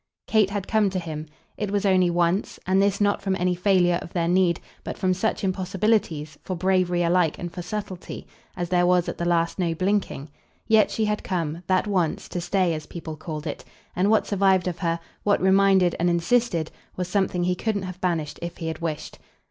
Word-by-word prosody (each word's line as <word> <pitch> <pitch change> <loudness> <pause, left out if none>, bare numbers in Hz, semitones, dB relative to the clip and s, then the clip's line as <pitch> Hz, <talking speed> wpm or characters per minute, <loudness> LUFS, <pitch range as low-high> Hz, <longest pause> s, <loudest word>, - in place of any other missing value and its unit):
Kate 215 -3 +3
had 200 -1 -3
come 215 -2 +3
to 190 - -3
him; 160 -3 -5 0.3
it 210 - -2
was 205 0 0
only 185 -2 +4
once 175 +3 0
and 190 +1 +3
this 200 0 +2
not 205 -1 +2
from 195 -1 0
any 180 -1 +1
failure 180 -1 +3
of 170 - -10
their 170 -2 0
need, 175 -1 +3 0.2
but - - -5
from 185 -2 +1
such 205 +4 -1
impossibilities, 185 -4 0
for 185 - -3
bravery 180 -1 +1
alike 170 -2 +2
and 175 -1 -5
for 180 - -5
subtlety, 185 0 -6 0.3
as 175 -1 -3
there 175 -1 +3
was 180 -1 +3
at - - -5
the 170 - -1
last 170 +1 +1
no 170 -2 0
blinking; 185 -5 -1 0.4
yet 220 -2 +4
she 220 - 0
had 210 0 -1
come, 170 -3 -2
that 185 +2 +2
once, 185 -6 0
to 175 - -4
stay, 175 -1 +1
as 155 -1 -6
people 160 -2 -7
called 155 0 -6
it; 150 - -5 0.3
and 185 +3 +2
what 220 - +3
survived 190 -2 +2
of 175 -1 -3
her, 170 -2 0 0.2
what 205 -1 +2
reminded 190 -2 +4
and 175 +1 +2
insisted, 170 -1 +1 0.2
was 180 -1 -3
something 185 -2 0
he 180 +1 +2
couldn't 205 +1 -2
have 185 0 -7
banished 165 -5 -1
if 170 0 -5
he 165 - -3
had 160 - -5
wished. 160 -3 -4
180 Hz, 205 wpm, -24 LUFS, 170-195 Hz, 0.4 s, only